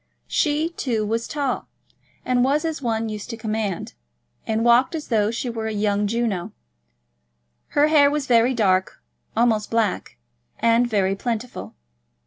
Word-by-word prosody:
She, 300 +2 +1
too, 235 -10 -2
was 230 +2 -2
tall, 280 -3 -2 0.6
and 250 -1 +2
was 290 +4 +1
as 320 -3 -3
one 225 -2 -1
used 210 -1 -6
to 230 - -5
command, 215 -4 -3 0.5
and 225 +1 0
walked 240 +6 +4
as 310 - -6
though 215 -3 +2
she 235 +3 -3
were 225 -2 -3
a - - -2
young 205 -1 0
Juno. 210 -4 -2 1.2
Her 290 - +6
hair 300 -2 +5
was 295 -1 -1
very 245 0 +3
dark, 190 -4 +1 0.4
almost 225 -3 +2
black, 225 -4 -1 0.4
and 230 +1 +3
very 195 -4 +1
plentiful. 235 +3 -5
230 Hz, 145 wpm, -23 LUFS, 215-255 Hz, 1.2 s, Her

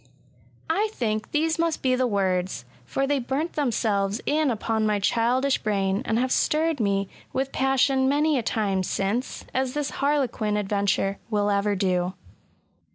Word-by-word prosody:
I 420 +6 +1
think 215 - -2
these 320 +2 0
must 335 -1 0
be 260 -1 +3
the 255 0 +2
words, 185 - -1 0.2
for 145 - -1
they 285 0 +1
burnt 275 +7 -2
themselves 215 -7 0
in 300 0 +2
upon 225 -1 -1
my 210 -1 +2
childish 245 +6 +2
brain, 195 -1 0
and 225 - 0
have 255 +2 0
stirred 315 +1 +1
me 200 -2 +1 0.3
with 265 +1 -1
passion^ 270 0 +2
many 295 +1 +2
a - - 0
time 205 -4 0
since; 200 +7 -2
as 260 0 -1
this 295 -1 -1
harlequin 255 -7 +1
adventure 200 -1 0
will 205 -2 +1
ever 200 0 +1
do. 185 -1 0
230 Hz, 155 wpm, -25 LUFS, 200-275 Hz, 0.3 s, be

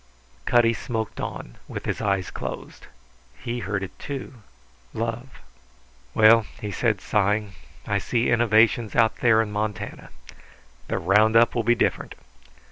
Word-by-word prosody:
Cutty 120 -1 +4
smoked 110 -2 -4
on, - - -7
with - - -7
his - - -3
eyes 95 -3 -1
closed. - - -7 0.5
He 120 - -4
heard 100 -3 -3
it, 95 - -9
too. 135 -4 -7 0.5
Love. 115 +2 -4 0.8
"Well," 110 0 +6
he 105 - -5
said, 110 -1 0
sighing, 105 +1 0 0.3
"I 100 -1 0
see 120 +4 0
innovations 115 -1 +3
out 115 -2 +3
there 110 -2 +4
in 105 - -7
Montana. 105 -1 -4 0.8
The - - -2
round 105 +5 +3
up 115 +1 +5
will 120 - 0
be 120 +2 +3
different. - - -1
110 Hz, 135 wpm, -24 LUFS, 105-115 Hz, 0.8 s, Well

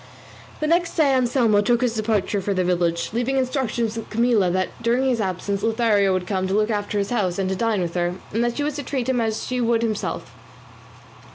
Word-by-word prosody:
The - - +1
next 340 +2 +1
day 295 -5 +3
Anselmo 240 -4 +3
took 235 +3 +2
his 245 -2 +1
departure 215 -2 0
for 200 +1 -1
the 185 - +1
village, 175 -1 0
leaving 245 +3 0
instructions 250 -4 -1
with 225 - -6
Camilla 230 -4 +2
that 185 +1 0
during 240 +3 +1
his 245 -4 +1
absence 195 +1 -2
Lothario 225 -3 +2
would 185 -1 -1
come 190 -1 -1
to 190 - 0
look 215 +1 +2
after 205 0 -2
his 200 +2 -1
house 190 -7 0
and 195 -1 0
to 190 - -1
dine 220 -1 0
with 170 -1 -4
her, 175 0 -1 0.2
and 230 +2 +1
that 240 0 -1
she 290 - 0
was 295 0 -2
to 285 - -4
treat 260 -3 -3
him 250 -2 +1
as 220 -1 -2
she 250 0 -2
would 230 -1 +2
himself. 215 -2 -3
225 Hz, 220 wpm, -22 LUFS, 195-245 Hz, 0.2 s, day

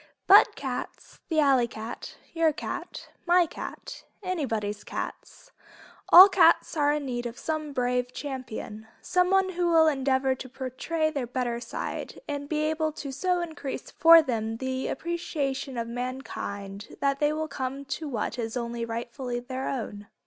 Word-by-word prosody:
But 400 +2 +7
cats, - - -6
the 320 -2 +2
alley 270 -5 +4
cat, 225 0 -8 0.2
your 330 -1 +3
cat, - - -6 0.2
my 350 0 +5
cat, - - -8 0.2
anybody's 225 - -2
cat, - - -7 0.6
all 370 +3 +12
cats 335 -4 +4
are 290 -2 +3
in 295 -1 -1
need 240 -2 -3
of 235 +1 -9
some 310 -2 -3
brave 250 -1 0
champion, 250 -6 -6 0.2
someone 375 +1 +3
who 355 -1 -1
will 325 -1 +6
endeavor 265 -3 +2
to 260 0 -8
portray 275 +5 -2
their 275 -5 -3
better 245 -1 -2
side - - -5
and 285 -1 -4
be 305 -1 0
able 315 0 0
to 285 -2 -6
so 360 +6 0
increase 315 -5 -6
for 330 0 +8
them 225 -4 -2
the 260 +1 -3
appreciation 280 -5 -3
of 230 0 -2
mankind 230 -5 -6
that 275 0 +1
they 295 0 +3
will 315 +1 -2
come 275 -1 -4
to 300 +2 -4
what 235 -1 -3
is 225 +1 -3
only 235 -1 -3
rightfully 240 +2 -4
their 260 +2 -4
own. 205 -6 -5
270 Hz, 155 wpm, -27 LUFS, 240-315 Hz, 0.6 s, all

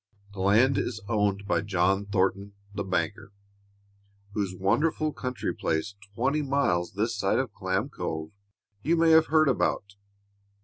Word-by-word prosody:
The 100 - -10
land 110 +8 +4
is 110 - -3
owned 105 -3 0
by - - +1
John 100 0 +1
Thornton, 100 0 0 0.2
the 100 - -3
banker, 95 +2 -2 1.0
whose 100 -3 -2
wonderful 150 - +1
country 125 -1 -3
place, 80 +6 -2 0.2
twenty 140 +6 +1
miles 135 -12 0
this 110 +4 -1
side 100 -2 +1
of - - -2
Clam - - -1
Cove, 80 0 -5 0.5
you 165 +8 +1
may 165 0 +4
have 160 0 +6
heard 155 -1 +4
about. 100 -6 0
100 Hz, 140 wpm, -27 LUFS, 95-135 Hz, 1.0 s, have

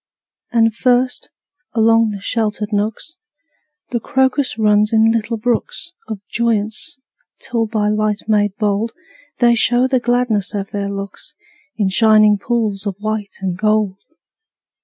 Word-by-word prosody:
And 225 -2 +3
first, 250 +2 +1 0.5
along 225 0 +4
the 205 -1 -5
sheltered 215 -1 -2
nooks, 215 - -2 0.7
The 240 - 0
crocus 265 +1 0
runs 210 -1 +3
in 225 0 +4
little 230 0 -1
brooks 245 - -2 0.2
Of 215 -3 -6
joyance, 220 +1 -1 0.4
till 230 -2 -1
by 215 -1 0
light 215 0 0
made 205 -2 +2
bold 210 +2 0 0.4
They 240 -1 +4
show 245 +2 +3
the 260 -1 +2
gladness 240 -4 0
of 200 -1 -4
their 200 -1 -3
looks 200 -1 -7 0.4
In 205 -3 +1
shining 215 0 +5
pools 215 -3 -1
of 195 - -2
white 215 -1 -4
and 185 -2 -2
gold. 210 -1 0
215 Hz, 135 wpm, -18 LUFS, 205-235 Hz, 0.7 s, shining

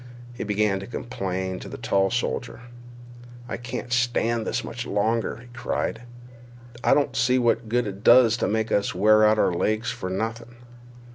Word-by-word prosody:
He - - -5
began 105 -1 0
to 100 - -8
complain 95 -6 -4
to - - -9
the - - -7
tall 95 0 +1
soldier. 120 +2 -3 0.9
"I - - -4
can't 120 0 -5
stand 120 -2 +1
this - - -1
much 120 +1 -6
longer," 110 +3 0
he 120 +1 -14
cried. 120 -1 -3 0.8
"I - - +5
don't 145 - 0
see 125 +1 +3
what 120 -2 +1
good 120 +2 +1
it 100 0 -7
does 120 -2 +6
to - - 0
make 110 +1 -1
us 100 -2 +1
wear 110 +3 +5
out 110 0 +5
our 90 - +2
legs 110 +6 0
for 95 - -5
nothin'." 115 +5 -4
110 Hz, 170 wpm, -24 LUFS, 100-120 Hz, 0.9 s, does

